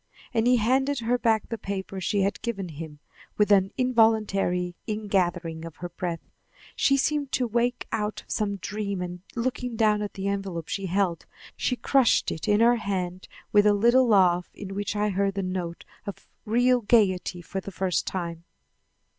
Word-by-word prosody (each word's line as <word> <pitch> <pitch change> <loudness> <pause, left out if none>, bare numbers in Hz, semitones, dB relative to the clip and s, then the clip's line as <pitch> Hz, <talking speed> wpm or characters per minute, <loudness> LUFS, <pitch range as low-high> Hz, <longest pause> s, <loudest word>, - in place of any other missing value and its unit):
And 225 +1 +2
he 250 - +6
handed 265 +4 +1
her 240 +2 +1
back 220 -3 +2
the 230 - -4
paper 195 -1 -5
she 200 +3 +1
had 200 +2 -1
given 200 -6 -3
him. 155 -1 -8 0.4
With 210 0 +3
an 195 -1 +4
involuntary 215 -8 +2
ingathering 180 -6 -1
of 165 -2 -8
her 175 - -6
breath, 175 -1 -5 0.5
she 275 - +3
seemed 285 0 0
to 255 - +2
wake 240 +2 0
out 210 -1 -2
of - - -15
some 205 -2 0
dream 200 0 -4
and, 180 0 -6
looking 245 0 -2
down 215 -2 +3
at 205 - -5
the 195 0 -3
envelope 195 -5 -3
she 195 -1 -2
held, 185 -2 0 0.3
she 250 - 0
crushed 255 +1 +3
it 160 - -5
in 210 +1 +3
her 240 +1 +5
hand 185 -4 -3 0.2
with 205 0 +5
a 205 - +5
little 240 +5 +4
laugh 180 -5 +4
in 195 -1 -7
which 205 +1 -3
I 210 0 +1
heard 195 0 0
the 195 - -1
note 180 -2 -4 0.2
of 200 - -7 0.2
real 245 +3 +3
gaiety 190 -5 +2
for 190 +3 -4
the 200 - -7
first 185 -1 -1
time. 170 -3 -4
200 Hz, 180 wpm, -26 LUFS, 185-230 Hz, 0.5 s, he